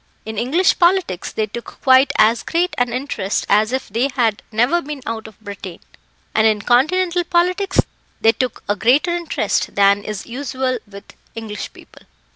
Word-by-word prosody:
In 220 0 -6
English 305 +11 +2
politics 345 - +1
they 215 - -1
took 235 +3 -9
quite 260 +1 +5
as 220 +2 +4
great 350 +2 -1
an 245 -1 +1
interest 240 -6 -2
as 215 +3 +3
if 260 0 -2
they 235 +7 0
had 225 -5 +1
never 245 +11 +2
been 290 -3 -7
out 220 -1 -4
of 220 - -16
Britain, 200 -4 -8 0.6
and 220 0 +4
in 210 -2 +1
Continental 350 +8 +2
politics 365 +2 +1 0.4
they 225 - +5
took 255 0 -3
a 205 - +1
greater 260 - +2
interest 340 - -1
than 200 0 +4
is 210 -2 -6
usual 255 0 -3
with 200 -1 -13 0.2
English 220 -2 -6
people. - - -17
245 Hz, 165 wpm, -19 LUFS, 215-300 Hz, 0.6 s, quite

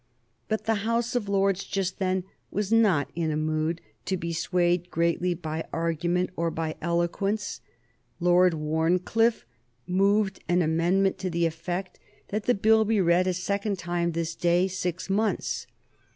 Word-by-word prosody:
But 215 -1 -2
the 220 -2 +1
House 235 +1 0
of 215 -5 -1
Lords 195 -1 +2
just 195 -1 -2
then 185 -1 0 0.3
was 205 +1 -2
not 205 -10 +3
in 165 -1 -1
a 150 - -1
mood 155 +2 -1 0.2
to 190 - -1
be 170 -1 -4
swayed 175 +1 +1
greatly 170 +2 +1
by 160 -1 -4
argument 170 +2 0
or 170 0 0
by 160 -1 -3
eloquence. 175 +5 -1 0.6
Lord 180 0 +4
Wharncliffe 170 - +1 0.4
moved 195 +2 +1
an 175 0 +3
amendment 175 +5 +2
to 185 - -2
the 170 0 +1
effect 175 +3 -4 0.3
that 210 +1 -2
the 245 - +3
Bill 220 +2 +4
be 220 0 +1
read 180 0 +3
a 185 - +2
second 200 +2 -1
time 170 -1 -1
this 165 0 -2
day 175 +2 +2
six 180 -2 -3
months. 210 +2 -1
180 Hz, 150 wpm, -27 LUFS, 170-200 Hz, 0.6 s, Lord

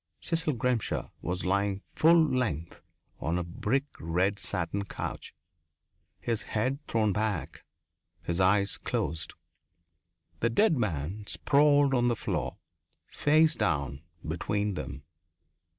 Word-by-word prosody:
Cecil 165 -2 0
Grimshaw 125 -2 -1
was 90 +2 -2
lying 100 +1 0
full 165 +2 +6
length 105 - -2 0.4
on 80 +5 -1
a 90 - -1
brick 120 +9 -1
red 90 +5 0
satin 100 +2 -1
couch, 100 - -6 0.8
his 115 -2 -1
head 130 +6 -1
thrown 110 -3 +2
back, 105 -4 -2 0.6
his 85 +2 -1
eyes 100 +1 +3
closed. 80 -3 -3 1.0
The 115 - +2
dead 165 - +4
man 100 - -2
sprawled 145 -1 +4
on 120 -1 +3
the 120 - +2
floor, - - -3 0.5
face 155 +2 +4
down, 70 - -1 0.3
between 100 +6 -1
them. 70 -6 -6
105 Hz, 115 wpm, -29 LUFS, 90-125 Hz, 1.0 s, full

